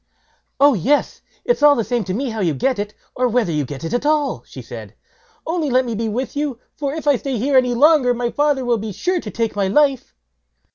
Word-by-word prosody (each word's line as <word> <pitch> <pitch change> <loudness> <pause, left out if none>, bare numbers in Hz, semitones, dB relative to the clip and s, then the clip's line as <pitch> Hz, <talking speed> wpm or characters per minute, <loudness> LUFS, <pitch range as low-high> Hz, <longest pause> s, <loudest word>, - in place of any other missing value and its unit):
"Oh 285 +1 +6
yes! 255 - 0 0.2
it's 485 - +1
all 295 -1 +7
the 230 - 0
same 240 0 -1
to 185 - -3
me 260 +1 -2
how 220 - -5
you 170 -7 0
get 255 - 0
it, 205 +1 -4 0.2
or 250 0 +1
whether 240 -6 +1
you 150 -2 -1
get 135 +2 -8
it 165 - -4
at 245 - 0
all", 295 -1 +1
she - - -11
said; - - -10 0.5
"only 325 -3 -1
let 255 0 +2
me 235 - -3
be 225 +1 -2
with 250 +6 -3
you, 285 -4 -2 0.2
for 280 -2 -3
if 315 -2 -6
I 285 -3 +4
stay 265 0 -3
here 270 +5 0
any 250 -2 +3
longer, 290 -1 +5
my 240 0 -1
father 290 -3 +1
will 240 -2 +1
be 210 -1 -5
sure 360 - -1
to 215 - -7
take 225 -1 -2
my 200 -2 0
life." 275 - +1
250 Hz, 240 wpm, -20 LUFS, 220-285 Hz, 0.5 s, all